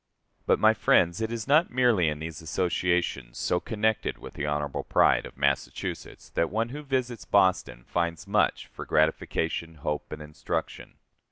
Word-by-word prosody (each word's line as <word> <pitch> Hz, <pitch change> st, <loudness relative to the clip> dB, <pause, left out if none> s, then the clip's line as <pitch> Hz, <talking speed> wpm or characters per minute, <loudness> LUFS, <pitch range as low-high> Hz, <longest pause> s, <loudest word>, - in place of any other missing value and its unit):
But, -, -, +4 dB
my -, -, +5 dB
friends, 85 Hz, +4 st, +3 dB
it 110 Hz, 0 st, -2 dB
is 115 Hz, 0 st, -4 dB
not 155 Hz, +5 st, +4 dB
merely 120 Hz, -8 st, +3 dB
in 75 Hz, -1 st, -1 dB
these 80 Hz, 0 st, -7 dB
associations, 85 Hz, -6 st, -1 dB
so 90 Hz, -, 0 dB
connected 110 Hz, +2 st, -1 dB
with -, -, -11 dB
the 75 Hz, -, -3 dB
honorable 75 Hz, -1 st, -2 dB
pride -, -, +3 dB
of -, -, -16 dB
Massachusetts, 70 Hz, 0 st, -2 dB
that 85 Hz, -, 0 dB
one 115 Hz, +3 st, -1 dB
who 145 Hz, +4 st, -6 dB
visits 125 Hz, -7 st, -2 dB
Boston 95 Hz, -10 st, +2 dB
finds 85 Hz, 0 st, -2 dB
much -, -, +1 dB
for -, -, -9 dB
gratification, 80 Hz, +1 st, 0 dB
hope, 75 Hz, 0 st, -4 dB
and 75 Hz, -, -6 dB
instruction. 75 Hz, 0 st, -5 dB
85 Hz, 160 wpm, -27 LUFS, 75-110 Hz, -, my